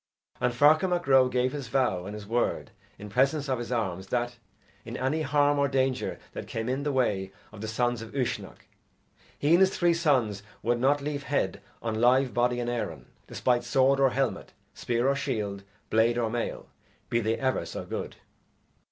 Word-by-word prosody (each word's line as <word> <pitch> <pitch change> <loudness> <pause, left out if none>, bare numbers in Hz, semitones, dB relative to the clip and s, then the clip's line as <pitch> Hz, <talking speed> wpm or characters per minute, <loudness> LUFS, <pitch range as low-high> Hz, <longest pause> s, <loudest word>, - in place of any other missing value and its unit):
And 125 - +1
Ferchar 150 +8 +5
Mac 175 -1 0
Ro 130 -2 +5
gave 125 0 +1
his 140 -3 -5
vow 115 -8 0
and 105 - -6
his 105 -1 -8
word 120 +3 -1 0.3
in 105 - -9
presence 135 +7 +1
of 130 -2 0
his 120 +1 -5
arms 95 -6 -2
that, 120 +2 -2 0.5
in - - -6
any 135 +5 0
harm 145 0 +2
or 140 - +3
danger 130 -1 0 0.2
that - - -6
came 115 0 -4
in 130 +2 -1
the 145 0 -1
way 100 -8 0 0.2
of 110 - -11
the 110 - -4
sons 120 +1 0
of 115 - -9
Uisnech, 130 -3 -3 0.7
he 145 - +1
and 170 - +7
his 190 0 +3
three 175 -1 +3
sons 130 - +1 0.2
would 120 +1 +1
not 140 +3 +3
leave 145 -1 -3
head - - -1 0.2
on 110 -1 -2
live 130 +1 +4
body 125 0 +1
in 120 - -2
Erin, 120 -1 -4 0.2
despite 120 -1 +1
sword 135 +2 +3
or 135 -1 +5
helmet, 135 +1 -2 0.2
spear 120 +1 -1
or 140 - +3
shield, 105 -8 -3 0.3
blade 115 +2 +3
or 115 -2 0
mail, 120 0 -3 0.4
be 115 - +3
they 110 0 0
ever 130 -8 0
so 85 - -6
good. - - -5
125 Hz, 190 wpm, -28 LUFS, 115-140 Hz, 0.7 s, and